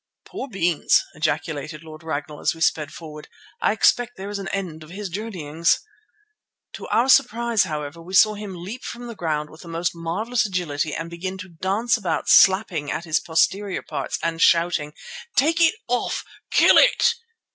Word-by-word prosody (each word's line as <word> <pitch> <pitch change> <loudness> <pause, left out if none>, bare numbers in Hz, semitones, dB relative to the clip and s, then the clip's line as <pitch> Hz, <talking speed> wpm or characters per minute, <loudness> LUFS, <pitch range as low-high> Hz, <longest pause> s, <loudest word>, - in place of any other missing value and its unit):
"Poor 270 - -6
Beans!" 175 - +2
ejaculated 155 0 -3
Lord 155 0 -11
Ragnall 150 -2 -5
as - - 0
we 165 - -13
sped 155 -2 +1
forward. 155 -2 -10 0.3
"I - - +3
expect 245 +3 +2
there 195 +2 -6
is 205 - -4
an 195 - -5
end 180 -6 -4
of 155 - -14
his 195 +2 -6
journeyings." 170 -5 -1 0.9
To - - -8
our 240 +3 +2
surprise, 235 -4 +3
however, 150 0 -5
we 185 +3 -6
saw 215 +2 +6
him 205 -2 -7
leap 195 +9 -8
from 240 0 -7
the 235 - -6
ground 155 -6 -3
with 155 - -14
the - - -12
most 170 +1 -2
marvellous 190 +9 -1
agility 160 -6 -2
and 165 - -4
begin 185 +3 -5
to 185 -1 -9
dance 195 +8 0
about 180 -7 -2
slapping 190 -7 +5
at 170 - -3
his 160 -1 +1
posterior 190 +4 0
parts - - -4
and 165 0 -1
shouting, 165 -3 +3 0.4
"Take 325 +5 +3
it 330 +6 +5
off! 245 0 -1 0.2
Kill - - +6
it!" - - +4
175 Hz, 175 wpm, -23 LUFS, 160-210 Hz, 0.9 s, saw